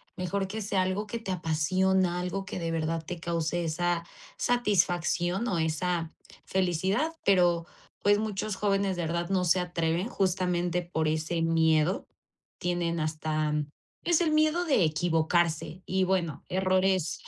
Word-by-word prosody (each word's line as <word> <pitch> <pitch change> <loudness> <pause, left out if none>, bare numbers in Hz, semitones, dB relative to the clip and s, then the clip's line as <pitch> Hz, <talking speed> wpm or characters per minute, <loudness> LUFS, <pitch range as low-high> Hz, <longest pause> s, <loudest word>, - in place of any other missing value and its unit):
mejor 195 +1 -2
que 215 +3 -5
sea 195 -2 +1
algo 190 +3 -2
que 235 - -4
te 225 -4 -5
apasiona, 180 +2 +1
algo 180 +2 -3
que 185 - -5
de 165 -1 -2
verdad 165 0 -1
te 175 +2 -6
cause 170 0 -1
esa 170 +1 0 0.3
satisfacción 185 -3 +1
o 190 - 0
esa, 165 +1 -1 0.3
felicidad, 190 - 0
pero, 175 -3 +3 0.4
pues 205 +1 +4
muchos 215 -1 -2
jóvenes 195 -1 +1
de - - -1
verdad 170 +1 -2
no 190 -2 +1
se 175 +2 +4
atreven 175 +1 -1
justamente 180 -3 0
por 160 -2 -1
ese 160 +2 -1
miedo, 160 +1 +2 0.5
tienen 175 -1 -1
hasta, 155 -1 -1 0.5
es 345 -1 +3
el 335 - +2
miedo 310 +3 +2
de 275 - +3
equivocarse 165 +2 +1
y 190 0 +1
bueno, 180 -5 -1
errores, 185 -2 +1
180 Hz, 140 wpm, -28 LUFS, 165-190 Hz, 0.5 s, pues